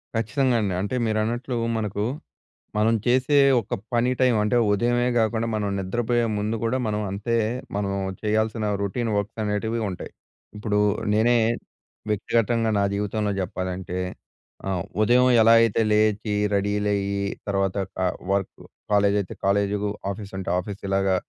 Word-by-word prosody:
ఖచ్చితంగా 130 Hz, +2 st, +1 dB
అండి. 100 Hz, -3 st, -1 dB
అంటే 100 Hz, +6 st, -2 dB
మీరన్నట్లూ 115 Hz, +4 st, -1 dB, 0.2 s
మనకు 105 Hz, -1 st, -2 dB, 0.7 s
మనం 110 Hz, +2 st, +3 dB
చేసే 130 Hz, +4 st, +3 dB, 0.2 s
ఒక 100 Hz, -, -4 dB, 0.2 s
పని 120 Hz, +2 st, +2 dB
టైమ్ 125 Hz, -3 st, +4 dB
అంటే 105 Hz, +4 st, +1 dB, 0.2 s
ఉదయమే 120 Hz, +3 st, +1 dB
గాకుండా 115 Hz, 0 st, +1 dB
మనం 105 Hz, -1 st, -1 dB
నిద్రపోయే 120 Hz, +5 st, 0 dB
ముందు 105 Hz, +2 st, -1 dB
గూడా 120 Hz, +3 st, +1 dB
మనం 105 Hz, -1 st, -1 dB
అంతే 105 Hz, +4 st, -1 dB, 0.4 s
మనం 100 Hz, -1 st, -1 dB, 0.3 s
చెయ్యాల్సిన 110 Hz, +1 st, 0 dB, 0.2 s
రొటీన్ 115 Hz, +3 st, -1 dB
వర్క్స్ 100 Hz, +2 st, -3 dB
అనేటివి 110 Hz, +2 st, -1 dB
ఉంటాయి. 90 Hz, -2 st, -7 dB, 0.4 s
ఇప్పుడూ 105 Hz, -1 st, -1 dB, 0.3 s
నేనే 115 Hz, +3 st, +4 dB, 0.7 s
వ్యక్తిగ‌తంగా 115 Hz, +2 st, +1 dB
నా 100 Hz, -, +2 dB
జీవితంలో 105 Hz, +1 st, -1 dB
జెప్పాలంటే 90 Hz, -1 st, -4 dB, 0.7 s
ఆహ్, 90 Hz, -3 st, -1 dB, 0.2 s
ఉదయం 125 Hz, +3 st, +5 dB
ఎలా 115 Hz, +1 st, +6 dB
అయితే 115 Hz, -1 st, +2 dB
లేచీ 105 Hz, 0 st, +2 dB, 0.2 s
రెడీలయ్యి 100 Hz, 0 st, 0 dB, 0.3 s
తర్వాత 95 Hz, -1 st, 0 dB, 0.2 s
ట -, -, -11 dB, 0.3 s
వర్క్ 100 Hz, -1 st, 0 dB, 0.4 s
కాలేజ్ 100 Hz, 0 st, +3 dB
అయితే 95 Hz, -, -6 dB
కాలేజీలు 100 Hz, +1 st, +1 dB, 0.2 s
ఆఫీస్ 100 Hz, 0 st, -7 dB
అంటే 95 Hz, -, -5 dB
ఆఫీస్ 100 Hz, +2 st, -5 dB
ఇలాగా 95 Hz, 0 st, +2 dB
105 Hz, 130 wpm, -24 LUFS, 100-115 Hz, 0.7 s, ఎలా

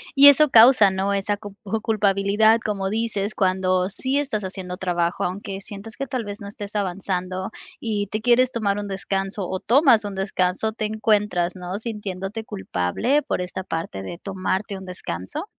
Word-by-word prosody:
Y 280 Hz, +1 st, +9 dB
eso 290 Hz, +1 st, +7 dB
causa, 225 Hz, -3 st, +7 dB
¿no? 195 Hz, +1 st, 0 dB
Esa 200 Hz, +1 st, -1 dB
cu 205 Hz, -2 st, -10 dB, 0.3 s
culpabilidad, 210 Hz, +1 st, +3 dB
como 195 Hz, -2 st, -1 dB
dices, 215 Hz, -2 st, -2 dB
cuando 185 Hz, -1 st, +1 dB
sí 265 Hz, +7 st, -2 dB
estás 265 Hz, -8 st, -2 dB
haciendo 185 Hz, -1 st, -6 dB
trabajo, 175 Hz, -2 st, -1 dB
aunque 195 Hz, +1 st, -4 dB
sientas 205 Hz, +3 st, -10 dB
que, 275 Hz, -1 st, -3 dB
tal 255 Hz, -4 st, -2 dB
vez, 205 Hz, 0 st, -7 dB
no 200 Hz, -, -7 dB
estés 205 Hz, 0 st, -8 dB
avanzando 185 Hz, -1 st, -2 dB, 0.3 s
y 210 Hz, -3 st, -2 dB
te 215 Hz, +2 st, -3 dB
quieres 250 Hz, +2 st, +4 dB
tomar 205 Hz, -3 st, 0 dB
un 205 Hz, -, -5 dB
descanso 195 Hz, 0 st, -3 dB
o 185 Hz, -, -2 dB
tomas 240 Hz, -4 st, +4 dB
un 200 Hz, -1 st, -4 dB
descanso, 190 Hz, +2 st, 0 dB
¿te 215 Hz, -1 st, -3 dB
encuentras, 210 Hz, -5 st, +1 dB
no, 180 Hz, +2 st, -5 dB
sintiéndote 210 Hz, -1 st, -5 dB
culpable 95 Hz, -, 0 dB
por 180 Hz, -, -2 dB
esta 185 Hz, +1 st, -5 dB
parte 165 Hz, -, -4 dB
de 170 Hz, -, -7 dB
tomarte 190 Hz, +1 st, -3 dB
un 190 Hz, -, -9 dB
descanso? 95 Hz, -, -6 dB
200 Hz, 170 wpm, -23 LUFS, 185-220 Hz, 0.3 s, Y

